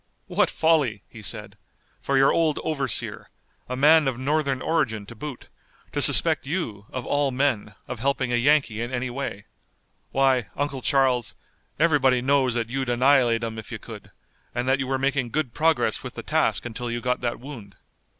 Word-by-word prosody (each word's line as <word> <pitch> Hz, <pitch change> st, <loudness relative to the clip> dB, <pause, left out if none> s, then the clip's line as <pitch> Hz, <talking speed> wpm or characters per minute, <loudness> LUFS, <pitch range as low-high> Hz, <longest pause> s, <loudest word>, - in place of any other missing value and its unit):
"What -, -, +1 dB
folly," 150 Hz, -, +1 dB
he -, -, -12 dB
said, -, -, -7 dB, 0.4 s
"for 140 Hz, -, 0 dB
your 135 Hz, +1 st, +5 dB
old 160 Hz, -3 st, +1 dB
overseer, 140 Hz, -6 st, -2 dB, 0.4 s
a 125 Hz, -, -2 dB
man 150 Hz, +3 st, +5 dB
of 130 Hz, -3 st, -1 dB
Northern 140 Hz, 0 st, 0 dB
origin 125 Hz, -10 st, -1 dB
to 110 Hz, -, -11 dB
boot, 140 Hz, +2 st, -8 dB, 0.4 s
to -, -, -1 dB
suspect -, -, +6 dB
you, 115 Hz, -, -4 dB
of 130 Hz, -2 st, -5 dB
all 145 Hz, -1 st, +1 dB
men, 125 Hz, -5 st, -1 dB
of 125 Hz, -, -6 dB
helping 130 Hz, -1 st, 0 dB
a -, -, +3 dB
Yankee 125 Hz, -3 st, +2 dB
in 120 Hz, +1 st, -4 dB
any 125 Hz, 0 st, -2 dB
way. 120 Hz, -6 st, -5 dB, 0.7 s
Why, 130 Hz, -4 st, +2 dB
Uncle 140 Hz, -2 st, -2 dB
Charles, 130 Hz, -4 st, +1 dB, 0.4 s
everybody 145 Hz, -6 st, +3 dB
knows 130 Hz, -1 st, +2 dB
that 115 Hz, -1 st, -1 dB
you'd 130 Hz, -1 st, -2 dB
annihilate 120 Hz, -2 st, +3 dB
'em 110 Hz, -1 st, -4 dB
if 110 Hz, -, -10 dB
you -, -, -4 dB
could, -, -, -11 dB, 0.5 s
and 120 Hz, +1 st, -2 dB
that 135 Hz, +1 st, +2 dB
you 130 Hz, -, -2 dB
were 135 Hz, 0 st, 0 dB
making 135 Hz, -2 st, 0 dB
good 145 Hz, -3 st, -2 dB
progress 160 Hz, +1 st, +1 dB
with -, -, -8 dB
the -, -, -6 dB
task -, -, 0 dB
until 120 Hz, +1 st, -5 dB
you 120 Hz, 0 st, -2 dB
got 125 Hz, +1 st, -1 dB
that 120 Hz, -1 st, -2 dB
wound." 120 Hz, -, -10 dB
130 Hz, 180 wpm, -24 LUFS, 120-140 Hz, 0.7 s, suspect